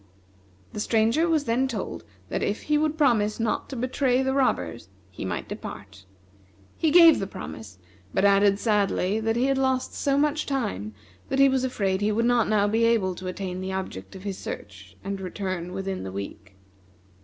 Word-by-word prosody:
"The - - -5
Stranger 230 +10 +2
was 315 -3 +2
then 255 +1 +1
told 210 - -5 0.3
that - - -2
if 205 - -2
he 300 0 +2
would 310 0 0
promise 230 -8 +2
not 225 -1 -1
to 270 - -6
betray 255 +1 +1
the 265 0 0
robbers 90 - 0 0.2
he 95 - -7
might 95 - -3
depart. 95 -1 -9 0.7
He 320 - +1
gave 335 0 +8
the 195 - -3
promise; 95 - -9 0.3
but 190 - +1
added 200 0 +5
sadly 205 -2 +1
that 225 0 0
he 245 +2 +2
had 270 0 +1
lost 260 -1 0
so 275 -1 0
much 300 +1 +1
time 105 - -2 0.3
that 270 - 0
he 275 0 +7
was 265 -1 +1
afraid 195 -7 0
he 210 +1 +2
would 230 +2 +1
not 240 -1 +3
now 205 -1 +3
be 225 +2 +1
able 225 -5 +2
to 185 +1 -8
attain 185 0 -4
the 190 0 -4
object 95 - -6
of 190 - -10
his 200 -2 -4
search 95 -1 -8
and 195 0 -4
return 185 -2 -4
within 190 0 -4
the 95 - -6
week. 100 0 -8
210 Hz, 190 wpm, -25 LUFS, 185-260 Hz, 0.7 s, gave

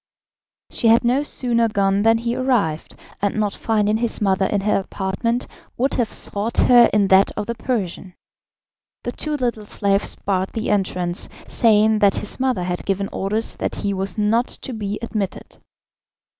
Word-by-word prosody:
She 230 - 0
had 225 +1 +5
no 250 +4 +2
sooner 240 -5 0
gone 200 -1 +1
than 225 +1 +4
he 235 +1 -2
arrived, 240 -12 -1 0.3
and 200 0 0
not 210 -2 0
finding 215 -1 0
his 235 0 -2
mother 190 -2 +1
in 205 - -1
her 205 0 +1
apartment, 200 +5 -2 0.3
would 265 +3 +1
have 235 -4 0
sought 210 +3 +1
her 240 -1 +6
in 200 -2 +2
that 190 +1 +5
of - - -2
the 235 - -3
Persian. 200 -6 -4 0.9
The - - -3
two 305 -1 -3
little 235 -5 -3
slaves 200 -1 0
barred 190 -1 -2
the 220 -1 -2
entrance, 180 -3 -1 0.2
saying 220 -1 +3
that 200 -2 +4
his 210 - -4
mother 255 -8 0
had 180 0 -3
given 195 0 -2
orders 210 +4 -2
that - - -3
he 200 - 0
was 195 0 -3
not 225 +4 +2
to 260 - -8
be 210 -2 -4
admitted. 210 -4 -5
210 Hz, 170 wpm, -21 LUFS, 195-235 Hz, 0.9 s, her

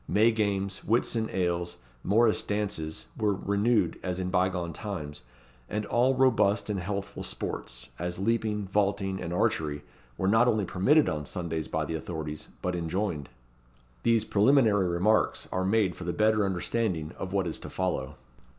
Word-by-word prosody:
May 110 +3 +4
games, 100 -3 -1
Whitsun 115 0 +1
ales, 85 -1 -1 0.3
Morrice 110 +3 +3
dances, 80 -10 -3
were 105 -2 +1
renewed 100 +4 +1
as 90 -1 -3
in 90 -1 -2
bygone 90 -2 0
times; 80 -9 -6 0.5
and 105 0 -2
all 125 +4 +2
robust 115 -5 +3
and 100 - -1
healthful 100 +2 -4
sports, 60 0 -5
as 90 +1 -3
leaping, 105 0 0
vaulting, 100 -1 0
and 85 - -4
archery, 75 -4 0 0.3
were 95 - 0
not 115 +4 +5
only 110 -4 +2
permitted 140 - +3
on 75 -2 -2
Sundays 80 -3 -3
by - - -1
the 80 - -4
authorities, 80 -2 -5 0.2
but 90 -1 0
enjoined. 85 -3 -2 0.7
These 115 -2 +3
preliminary 105 -3 +4
remarks 95 +6 +2
are 95 - 0
made 100 -1 +2
for - - -8
the 85 - -1
better 110 -1 +3
understanding 90 -3 -1
of 95 - -4
what 95 -1 +1
is 85 - -3
to - - -8
follow. 90 -8 -2
95 Hz, 155 wpm, -28 LUFS, 85-110 Hz, 0.7 s, not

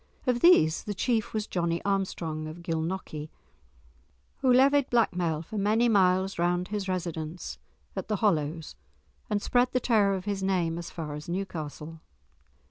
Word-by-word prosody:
Of 250 -2 +2
these 165 - +5
the 205 - -3
chief 225 +1 0
was 215 -1 -2
Johnie 170 -3 -1
Armstrong 170 -6 -2
of 165 +2 -9
Gilnockie, 160 -2 -3 1.1
who 265 -2 +2
levied 275 +2 +5
blackmail 175 -9 +1
for 210 +5 -5
many 215 +4 +3
miles 190 -3 +3
round 175 +1 +1
his 205 -2 -3
residence 170 -2 -4 0.4
at - - -4
the 215 - 0
Hollows, 160 -6 0 0.5
and 205 -1 0
spread 245 0 +2
the 255 - +3
terror 210 -5 +3
of 185 0 -5
his 200 -2 -2
name 175 -4 0
as 170 - -7
far 155 -4 -6
as 150 +2 -7
Newcastle. 165 -4 -5
185 Hz, 150 wpm, -28 LUFS, 165-210 Hz, 1.1 s, these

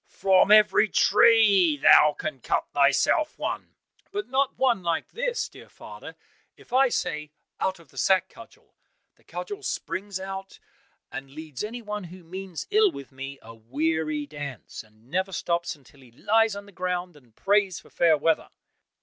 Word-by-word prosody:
From 190 0 +3
every 215 0 +6
tree 200 -8 +5
thou 150 +1 +6
can 155 -4 -5
cut - - 0
thyself 145 - +2
one." - - -5 0.4
"But 405 0 -4
not 270 +1 0
one 250 -6 +2
like 170 -2 -2
this, - - -2
dear - - -15
father. - - -11 0.4
If - - -17
I 265 0 +5
say, 150 -8 -2 0.3
'Out 190 0 -1
of 165 -5 -19
the - - -9
sack, 190 -2 +3
Cudgel!' 230 - -17 0.4
the - - -31
cudgel 410 0 -7
springs 200 - -4
out 195 0 -7 0.5
and 135 +1 -7
leads 155 0 -8
any 235 +3 -6
one 210 -2 -5
who 180 +1 -12
means 185 +1 -7
ill 425 0 +5
with 140 - -10
me 135 +1 -8
a 115 - -11
weary 150 +6 -2
dance, 145 -5 -8
and 110 +1 -24
never 190 +2 0
stops 170 -1 -2
until 140 -1 -21
he 130 -3 -18
lies 220 - +2
on 200 0 -8
the 205 - -15
ground 180 -1 -3
and 125 -6 -21
prays 200 -3 +1
for - - -20
fair 165 -3 +3
weather. 160 +2 0
180 Hz, 165 wpm, -26 LUFS, 150-210 Hz, 0.5 s, every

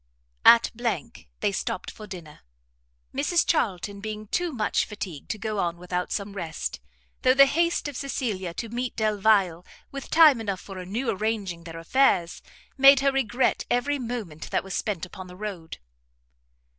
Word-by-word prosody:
At 235 0 +8
they 230 -2 -3
stopt 185 0 -3
for 215 - -11
dinner; 170 -6 -10 0.7
Mrs 295 +5 +2
Charlton 200 - 0
being 215 +1 -6
too 350 - -1
much 220 -6 0
fatigued 190 -8 -7
to 215 - -2
go 215 0 -3
on 170 -2 -1
without 180 0 -3
some 200 -1 -3
rest, 165 - -4 0.4
though 255 0 +4
the 275 0 +9
haste 335 +4 +1
of 290 - -6
Cecilia 225 -10 -3
to 230 - -4
meet 245 +2 -3
Delvile 205 -5 +2 0.5
time 310 -7 +6
enough 200 -4 -3
for 190 -2 -8
new 230 +6 -1
arranging 195 -5 -3
their 165 -1 -8
affairs, 175 -1 +2 0.4
made 275 0 +8
her 275 0 +3
regret 260 -2 0
every 280 +4 +1
moment 225 -11 -5
that - - 0
was 190 -1 -7
spent 195 -5 -2
upon 185 +1 -10
the 180 - -11
road. 190 -6 -6
215 Hz, 155 wpm, -26 LUFS, 185-250 Hz, 0.7 s, the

